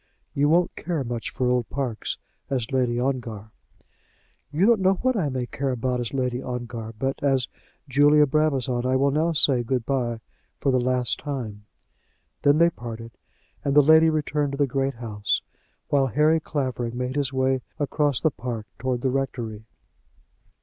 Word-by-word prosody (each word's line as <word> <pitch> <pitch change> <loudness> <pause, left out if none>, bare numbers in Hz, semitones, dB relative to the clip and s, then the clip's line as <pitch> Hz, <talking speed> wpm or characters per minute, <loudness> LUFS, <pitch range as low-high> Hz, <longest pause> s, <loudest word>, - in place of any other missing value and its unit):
"You 145 +1 +2
won't 175 +2 +2
care 165 -4 -2
much 120 -2 -4
for 125 - -1
old 125 -2 +1
parks 130 -6 -3 0.3
as 125 -4 -2
Lady 125 -2 +1
Ongar." 120 -5 -3 1.0
"You 160 +6 +2
don't 230 -1 +5
know 190 +1 +4
what 255 +6 0
I 170 -9 0
may 130 -2 -2
care 135 +2 -3
about 125 0 -1
as 120 -2 -3
Lady 125 -2 -1
Ongar; 120 -3 -5
but 135 +3 -2
as 135 -3 +2 0.4
Julia 145 +2 +5
Brabazon 135 -4 +1
I 130 +1 +1
will 140 +1 +3
now 160 +4 +1
say 135 -4 +3
good 120 0 -1
by 120 -4 -1 0.4
for 135 - +1
the 130 - +3
last 125 -1 +4
time." 110 -8 -6 0.7
Then 145 +1 +4
they 170 +1 +5
parted, 115 -3 -8 0.5
and 140 0 0
the 145 -2 +7
lady 160 +1 +7
returned 150 -2 -1
to - - -3
the 145 - +3
great 135 0 -1
house, 105 -3 -2 0.5
while 140 -2 +3
Harry 150 +5 +3
Clavering 130 -6 -3
made 125 +1 -3
his 140 -2 0
way 130 -1 +1 0.2
across 145 -2 0
the 160 - +2
park 120 -4 -5
towards 125 0 -2
the 130 - +2
rectory. 120 -5 -3
130 Hz, 170 wpm, -24 LUFS, 120-145 Hz, 1.0 s, the